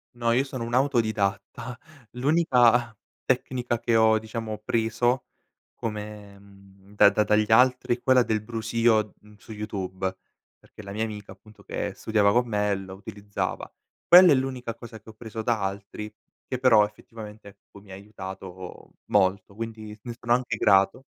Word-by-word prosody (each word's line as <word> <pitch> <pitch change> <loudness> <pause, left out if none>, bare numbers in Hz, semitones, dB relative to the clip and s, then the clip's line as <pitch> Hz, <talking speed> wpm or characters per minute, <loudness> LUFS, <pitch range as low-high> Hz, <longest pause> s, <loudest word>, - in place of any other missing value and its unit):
No, 120 -1 0
io 125 +3 +3
sono 130 -3 -6
un 120 +1 -6
autodidatta. 115 -3 -1 0.3
L'unica 125 -4 +3 0.3
tecnica 125 -2 -1
che 120 0 0
ho 110 0 +5
diciamo, 110 0 -5
preso 115 +3 0 0.5
come 105 -2 -7
mhmm, 100 0 -19
da 100 - +7
da 105 - +2
dagli 105 +1 +1
altri, 125 +1 +4
è - - -25
quella 130 -2 +4
del 110 -2 -1
brusio, 110 -1 0
mhmm, 105 0 -19
su 110 - -14
YouTube 95 -3 -4 0.4
perché - - -15
la 100 -1 -9
mia 110 +2 -2
amica, 105 -3 -6
appunto 105 +3 -19
che - - -4
studiava 105 -2 +2
con 120 +3 +2
me 105 -2 0
lo 95 -1 -8
utilizzava. 100 +1 -5 0.4
Quella 180 0 +9
è 140 - +6
l'unica 130 -3 -3
cosa 115 -1 -11
che 110 - -16
ho - - -11
preso 110 0 -7
da 115 -3 0
altri 100 +2 -5 0.4
che 130 - -3
però 125 -4 +5
effettivamente 105 0 -11
ecco, 100 0 -18
mi 100 -1 -16
ha - - -8
aiutato 95 -2 -10
molto, 100 0 +1
quindi 110 -1 -7
ne 120 -1 -7
sono 120 0 +1
anche 120 -2 0
grato. 100 +6 +3
110 Hz, 160 wpm, -25 LUFS, 100-120 Hz, 0.5 s, Quella